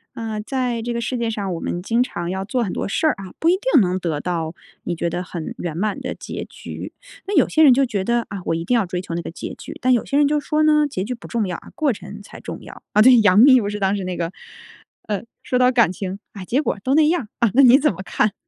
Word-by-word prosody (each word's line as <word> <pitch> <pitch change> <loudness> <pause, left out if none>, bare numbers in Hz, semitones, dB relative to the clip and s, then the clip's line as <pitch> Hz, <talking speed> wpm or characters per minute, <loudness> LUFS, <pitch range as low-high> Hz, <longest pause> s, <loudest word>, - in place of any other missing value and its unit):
呃， 220 -2 -4
在 250 -4 -1
这 240 - -3
个 235 - -2
世 235 +2 -2
界 235 -1 -1
上， 200 -4 -3
我 165 - -5
们 175 - -3
经 230 +5 +1
常 175 -9 -4
要 190 +1 -3
做 240 +4 -1
很 205 - -2
多 - - -3
事 315 +11 0
儿 310 - +3
啊， 190 -2 -9
不 325 - +1
一 - - +6
定 - - +3
能 185 -2 +1
得 165 -5 -2
到 165 -2 -3 0.3
你 175 - -2
觉 170 +1 -2
得 175 +2 -3
很 175 -3 -6
圆 170 -3 -4
满 205 +3 -1
的 - - -4
结 - - -6
局。 - - -9 0.3
那 405 - -2
有 290 - +4
些 315 - +3
人 285 -4 +8
就 270 +2 +3
觉 200 -5 -2
得： 235 +1 0
“啊， 195 -2 -6
我 - - 0
一 165 - -2
定 250 - +1
要 230 -4 +3
追 180 0 -4
求 175 -2 -6
那 170 - -2
个 - - -6
结 165 - -7
局。” - - -10
但 255 - +1
有 240 - +2
些 280 - 0
人 290 -1 +4
就 300 - +1
说 305 +1 0
呢：” 300 -1 +4
结 185 - -3
局 250 +5 -3
不 235 - -11
重 225 -3 -1
要 180 - -3
啊， - - -14
过 295 -5 +1
程 200 +2 -10
才 - - -12
重 - - -7
要。 - - -12
“啊， 210 - +4
对， 250 +3 +8
杨 205 -2 +5
幂 260 +3 +8
不 205 - -2
是 210 0 -5
当 195 +1 +1
时 195 - -4
那 180 0 -3
个， 170 +1 -2 0.8
呃， 205 0 -2 0.2
说 250 - 0
到： 250 0 +4
“感 235 -7 +4
情， 190 +1 -5 0.2
啊， 195 -3 -7
结 250 +9 +1
果 300 - -1
都 265 - +2
那 305 0 +5
样 340 -3 +1
儿。 210 - -13 0.2
“啊， - - -5
那 275 - +6
你 255 0 +8
怎 300 +1 +2
么 190 -1 -6
看？ 200 +3 +1
215 Hz, 315 characters per minute, -21 LUFS, 185-255 Hz, 0.8 s, 人